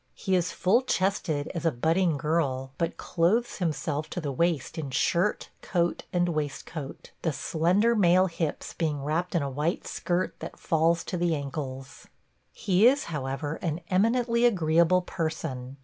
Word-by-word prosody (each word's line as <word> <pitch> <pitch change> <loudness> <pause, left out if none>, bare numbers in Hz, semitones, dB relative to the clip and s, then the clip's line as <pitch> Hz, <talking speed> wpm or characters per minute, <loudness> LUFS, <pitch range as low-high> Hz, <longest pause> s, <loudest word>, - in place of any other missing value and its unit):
He 190 -3 0
is 180 -1 +1
full 205 +7 +3
chested 185 - -1
as 170 -3 -4
a 165 - +3
budding 160 +5 +1
girl, 135 -4 -1
but 165 - -1
clothes 205 +8 +1
himself 155 -3 -2
to - - -4
the 150 -4 -3
waist 160 +1 0
in 145 -3 -4
shirt, 175 +9 +1
coat, 175 -2 -1
and 175 0 +1
waistcoat, 150 -1 -5
the 160 - 0
slender 180 - +2
male 185 -2 +5
hips 165 -4 -3
being 150 -4 -2
wrapped 165 +5 -1
in 165 - +2
a - - -1
white 150 +6 -1
skirt 180 +1 -1
that - - -8
falls 165 +1 +1
to 180 - -4
the 170 -1 +1
ankles. 135 -2 -6 0.4
He 195 +4 +3
is, 275 +3 +3
however, 145 +2 -3
an 165 -1 -2
eminently 235 +4 +2
agreeable 170 -2 +3
person. 155 -7 -4
165 Hz, 155 wpm, -27 LUFS, 150-180 Hz, 0.4 s, male